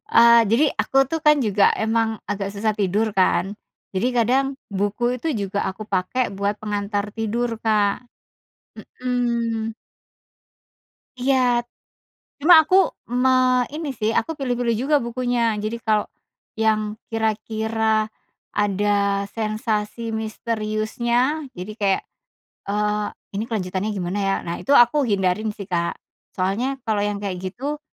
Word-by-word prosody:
Eee, 235 Hz, 0 st, +8 dB
jadi, 240 Hz, +7 st, +4 dB, 0.2 s
aku 270 Hz, -, -3 dB
tuh 325 Hz, -1 st, -1 dB
kan, 300 Hz, -, +7 dB
juga 205 Hz, -1 st, +3 dB, 0.2 s
emang 225 Hz, 0 st, +2 dB, 0.2 s
agak 195 Hz, -1 st, -2 dB
susah 215 Hz, +2 st, 0 dB
tidur, 205 Hz, +3 st, +1 dB
kan. 185 Hz, -1 st, +3 dB, 0.5 s
Jadi, 190 Hz, +6 st, +1 dB
kadang 250 Hz, +4 st, +3 dB, 0.2 s
buku 205 Hz, +4 st, -1 dB
itu 320 Hz, +6 st, -4 dB
juga 200 Hz, 0 st, -3 dB
aku 215 Hz, +3 st, -8 dB
pakai 185 Hz, +7 st, +1 dB
buat 200 Hz, +1 st, 0 dB
pengantar 205 Hz, -1 st, -2 dB
tidur 225 Hz, +2 st, -1 dB, 0.2 s
Kak. 210 Hz, +1 st, +2 dB, 1.0 s
Mhm. 235 Hz, -3 st, -1 dB, 1.4 s
Iya. 250 Hz, -2 st, +2 dB, 0.7 s
Cuma 325 Hz, +5 st, +7 dB
aku, 340 Hz, +4 st, +2 dB, 0.5 s
me 255 Hz, -1 st, +4 dB
ini 310 Hz, -2 st, -4 dB
sih, 220 Hz, 0 st, 0 dB
aku 320 Hz, +8 st, 0 dB
pilih-pilih 245 Hz, -3 st, 0 dB
juga 270 Hz, +7 st, +1 dB
bukunya. 235 Hz, -2 st, 0 dB
Jadi 220 Hz, +2 st, -2 dB
kalau, 215 Hz, -2 st, +2 dB, 0.5 s
yang 215 Hz, -1 st, +1 dB
kira-kira 220 Hz, 0 st, 0 dB, 0.5 s
ada 200 Hz, 0 st, +1 dB
sensasi 220 Hz, 0 st, -2 dB
misteriusnya, 230 Hz, +5 st, -1 dB
jadi 185 Hz, +4 st, -6 dB
kayak, 195 Hz, -2 st, +2 dB, 0.7 s
eee, 210 Hz, +1 st, 0 dB, 0.4 s
"Ini -, -, -1 dB
kelanjutannya 195 Hz, -1 st, -2 dB
gimana 185 Hz, +1 st, -3 dB
ya?" 195 Hz, -1 st, +1 dB
nah, 170 Hz, 0 st, -4 dB
itu 280 Hz, -, -1 dB
aku 255 Hz, +3 st, +5 dB
hindari 195 Hz, -1 st, +1 dB
sih 200 Hz, -2 st, -9 dB
Kak. 170 Hz, -1 st, 0 dB, 0.4 s
Soalnya, 235 Hz, +9 st, -1 dB
kalau 220 Hz, -3 st, 0 dB
yang 205 Hz, -1 st, -2 dB
kayak 190 Hz, -3 st, -3 dB
gitu, 250 Hz, +11 st, -4 dB
220 Hz, 125 wpm, -22 LUFS, 205-240 Hz, 1.4 s, Eee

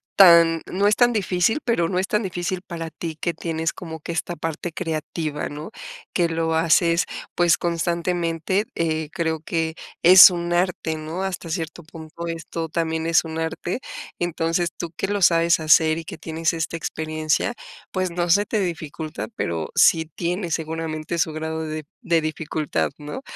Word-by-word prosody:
tan 170 Hz, -3 st, +7 dB
no 200 Hz, +2 st, +1 dB
es 210 Hz, -, +4 dB
tan 245 Hz, -1 st, +4 dB
difícil, 195 Hz, -, +1 dB
pero, 175 Hz, -9 st, +1 dB
no 180 Hz, -1 st, 0 dB
es 190 Hz, -, -1 dB
tan 210 Hz, +1 st, 0 dB
difícil 180 Hz, 0 st, -3 dB
para 165 Hz, -3 st, -6 dB
ti, 160 Hz, -1 st, -6 dB
que 170 Hz, -, -1 dB
tienes 165 Hz, 0 st, -2 dB
como 160 Hz, -3 st, -8 dB
que 170 Hz, -, -6 dB
esta 175 Hz, +1 st, -3 dB
parte 165 Hz, +2 st, -4 dB
creativa, 155 Hz, -3 st, -3 dB
¿no?, 150 Hz, +5 st, -7 dB, 0.4 s
que 175 Hz, -2 st, +2 dB
lo 165 Hz, 0 st, -1 dB
haces, 165 Hz, +1 st, +3 dB, 0.3 s
pues 175 Hz, -2 st, +4 dB
constantemente, 170 Hz, +2 st, 0 dB
eh, 160 Hz, -2 st, -1 dB
creo 160 Hz, -3 st, -2 dB
que 160 Hz, 0 st, -2 dB, 0.3 s
es 185 Hz, +2 st, +10 dB
un 175 Hz, 0 st, -2 dB
arte, 175 Hz, -3 st, 0 dB
¿no?, 155 Hz, +4 st, -5 dB
hasta 185 Hz, -3 st, -4 dB
cierto 165 Hz, +1 st, -4 dB
punto, 160 Hz, +1 st, -9 dB
esto 165 Hz, 0 st, -4 dB
también 160 Hz, 0 st, -2 dB
es 165 Hz, 0 st, +4 dB
un 160 Hz, 0 st, -5 dB
arte, 165 Hz, +6 st, -3 dB, 0.4 s
entonces 170 Hz, 0 st, 0 dB
tú 170 Hz, -, -5 dB
que -, -, -1 dB
lo 205 Hz, -1 st, -1 dB
sabes 170 Hz, -1 st, +4 dB
hacer 160 Hz, 0 st, +4 dB
y -, -, -7 dB
que -, -, -8 dB
tienes 160 Hz, 0 st, -1 dB
esta 165 Hz, 0 st, -3 dB
experiencia 155 Hz, +5 st, -1 dB, 0.4 s
pues, 185 Hz, -1 st, -1 dB
no 175 Hz, 0 st, -1 dB
se 205 Hz, +3 st, +4 dB
te 215 Hz, -, 0 dB
dificulta, 160 Hz, -4 st, -4 dB
pero, 85 Hz, -2 st, -2 dB
sí 160 Hz, -1 st, +5 dB
tiene 175 Hz, +1 st, -2 dB
seguramente 160 Hz, 0 st, -3 dB
su 160 Hz, -, +1 dB
grado 160 Hz, +1 st, -4 dB
de 155 Hz, -1 st, -5 dB, 0.2 s
de 170 Hz, -2 st, +2 dB
dificultad, 155 Hz, -1 st, -2 dB
¿no? 150 Hz, -, -7 dB
165 Hz, 170 wpm, -23 LUFS, 160-175 Hz, 0.4 s, es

